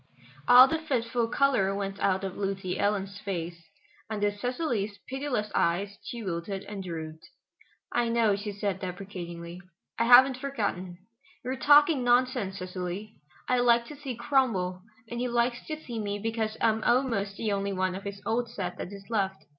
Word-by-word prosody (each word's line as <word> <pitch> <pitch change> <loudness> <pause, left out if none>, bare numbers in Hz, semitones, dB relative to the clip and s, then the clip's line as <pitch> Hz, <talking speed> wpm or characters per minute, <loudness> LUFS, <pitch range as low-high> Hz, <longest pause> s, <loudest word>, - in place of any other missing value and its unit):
All 250 +1 +10
the 320 +4 -1
fitful 240 -6 -1
color 235 -6 +2
went 195 0 -4
out 190 0 +1
of 190 -1 -4
Lucy 195 -2 -3
Ellen's 200 -1 -1
face. 170 -4 -5 0.4
Under 205 -2 0
Cecily's 220 -2 -2
pitiless 260 -5 -2
eyes 195 +4 0
she 235 -2 -6
wilted 190 +1 -4
and 200 -2 -6
drooped. 160 -3 -7 0.6
"I 240 -1 +1
know," 230 -3 +3
she 205 +1 -4
said 200 -2 -2
deprecatingly, 180 -2 -7 0.4
"I 230 - +3
haven't 250 +2 +8
forgotten. 200 -10 -3 0.5
You 255 - -2
are - - -1
talking 290 +1 +5
nonsense, 245 -5 +2
Cecily. 185 +3 -5 0.3
I 250 0 +2
like 235 -1 +4
to 300 - -8
see 275 -3 -6
Cromwell, 225 -8 +1 0.3
and 235 +1 -5
he 250 - 0
likes 240 0 0
to 310 -1 -4
see 240 -7 -6
me 205 -1 -2
because 220 0 -2
I'm 220 -1 +2
almost 230 -6 +1
the 220 -2 -1
only 200 0 -1
one 185 0 0
of 190 - -5
his 200 0 -6
old 235 +1 0
set 185 -6 -5
that - - -5
is 200 -1 -10
left. 195 -3 -1
205 Hz, 170 wpm, -28 LUFS, 195-245 Hz, 0.6 s, All